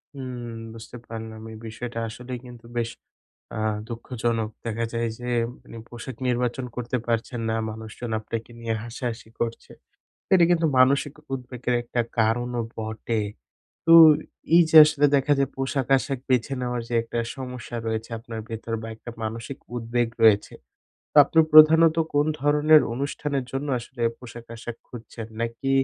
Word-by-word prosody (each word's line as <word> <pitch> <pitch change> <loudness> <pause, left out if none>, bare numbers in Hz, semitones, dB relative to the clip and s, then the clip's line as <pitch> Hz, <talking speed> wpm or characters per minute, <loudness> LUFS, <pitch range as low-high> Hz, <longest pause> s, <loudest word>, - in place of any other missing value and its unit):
হুম 125 -3 -6 0.2
বুঝতে 115 +2 -10
পারলাম 110 -1 -7
এই 110 - -9
বিষয়টা 115 +1 -6
আসলেই 125 +2 -7
কিন্তু 120 -1 -12
বেশ 115 -1 0 0.7
আ - - -3 0.3
দুঃখজনক। 115 -2 -2 0.2
দেখা 115 0 -1
যায় 115 0 -1
যে 125 0 -6 0.3
মানে 115 - -12
পোশাক 120 +2 -8
নির্বাচন 125 +1 0
করতে 125 +1 -2
পারছেন 115 +1 -1
না। 110 - 0 0.2
মানুষজন 110 +2 -7
আপনাকে 115 +1 -6
নিয়ে 115 -1 -2
হাসাহাসি 120 -1 -5
করছে। 115 -1 -3 0.6
এটা 175 -2 +6
কিন্তু 165 -1 +3
মানসিক 140 +2 +4 0.2
উদ্বেগের 125 -1 -3
একটা 120 0 -1 0.2
কারণও 120 +2 +1
বটে। 110 +1 -3 0.7
তো 165 - +6 0.6
এই 175 - +9
যে 160 - 0
আসলে 150 -1 +2
দেখা 140 +1 +1
যায় 135 -1 +1
পোশাক 135 -1 -1
আশাক 135 0 -3
বেছে 125 +1 +2
নেওয়ার 125 -1 -2
যে - - -4
একটা 115 +1 -5 0.2
সমস্যা 125 -3 -7
রয়েছে 110 +1 -3
আপনার 115 -1 -7
ভেতর 115 0 -5
বা 115 - -6
একটা 120 - -11
মানসিক 115 +4 -5 0.2
উদ্বেগ 120 0 0 0.2
রয়েছে। 105 -2 +5 0.6
তো - - -11
আপনি 160 - -1
প্রধানত 160 +1 +8 0.2
কোন 145 +1 +3
ধরনের 150 +1 +5
অনুষ্ঠানের 140 +1 -2
জন্য 135 +2 -2
আসলে 120 0 -8 0.2
পোশাক 120 -1 -11
আশাক 115 0 -7
খুঁজছেন? 115 -1 -9
নাকি 115 +3 -2
120 Hz, 150 wpm, -25 LUFS, 115-135 Hz, 0.7 s, এই